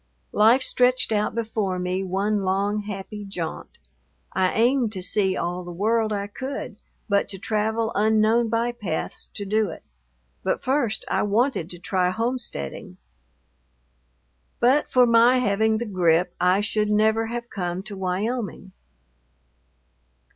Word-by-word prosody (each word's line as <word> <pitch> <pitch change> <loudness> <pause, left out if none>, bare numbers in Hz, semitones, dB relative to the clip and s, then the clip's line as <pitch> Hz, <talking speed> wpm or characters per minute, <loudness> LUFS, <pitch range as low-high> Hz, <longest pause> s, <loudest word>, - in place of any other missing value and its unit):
Life 235 +5 +5
stretched 250 -1 +2
out 210 0 0
before 215 -5 -1
me 180 +1 -2
one 200 +3 0
long, 195 +2 0
happy 205 0 -6
jaunt. 180 -5 -6 0.6
I 185 -1 +2
aimed 240 0 +2
to 185 -2 -2
see 190 0 +1
all 175 +1 -3
the 175 - -8
world 215 +4 +1
I 200 -1 -1
could, 245 +1 -6 0.3
but 200 -2 +1
to 195 - -3
travel 220 +3 -1
unknown 220 +2 +3
bypaths 230 -7 -2
to 205 - -4
do 215 0 +1
it. 160 - -10 0.5
But - - 0
first 255 -5 0
I - - 0
wanted 210 - +1
to 175 - -8
try 180 +1 0
homesteading. 225 - -4 1.6
But 265 +5 +3
for 250 -1 +6
my 235 +2 +5
having 220 -1 +2
the 235 - -3
grippe, 180 -3 +2
I 185 +2 +4
should 210 0 0
never 220 +1 +2
have 235 +1 -5
come 180 -1 -3
to 210 -1 -7
Wyoming. 195 +1 -3
210 Hz, 135 wpm, -24 LUFS, 190-230 Hz, 1.6 s, for